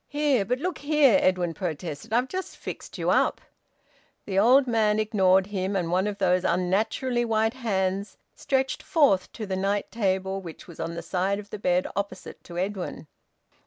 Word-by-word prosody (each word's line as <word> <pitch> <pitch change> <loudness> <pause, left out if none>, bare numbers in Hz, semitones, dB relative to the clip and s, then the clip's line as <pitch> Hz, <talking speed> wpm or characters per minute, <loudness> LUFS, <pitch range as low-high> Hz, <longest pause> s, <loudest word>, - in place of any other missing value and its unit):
"Here! 290 -7 +1
But 250 +5 0
look 350 +5 -3
here!" 285 -7 +4
Edwin 180 -2 +1
protested. 160 -2 -5
"I've 245 +3 +2
just 375 +6 -5
fixed - - -8
you - - 0
up - - +2 0.4
" - - -37
The 195 -1 0
old 255 +6 +6
man 220 -3 +2
ignored 190 -3 +3
him, 195 -1 -3
and 175 -3 -1
one 185 +3 +2
of 205 -1 -3
those 185 -2 +2
unnaturally 215 +8 0
white 225 0 +1
hands 195 -5 -2 0.2
stretched 265 -1 -1
forth 275 - +2
to 220 - -5
the 190 -1 -3
night 200 +2 -1
table, 190 -3 -1
which 170 -4 -10
was 170 - -13
on 165 +1 -4
the 170 - -5
side 185 +3 0
of 205 0 -10
the 210 - -6
bed 180 -2 +1
opposite 200 +1 -5
to 175 - -9
Edwin. 185 -2 -3
200 Hz, 180 wpm, -26 LUFS, 185-230 Hz, 0.4 s, old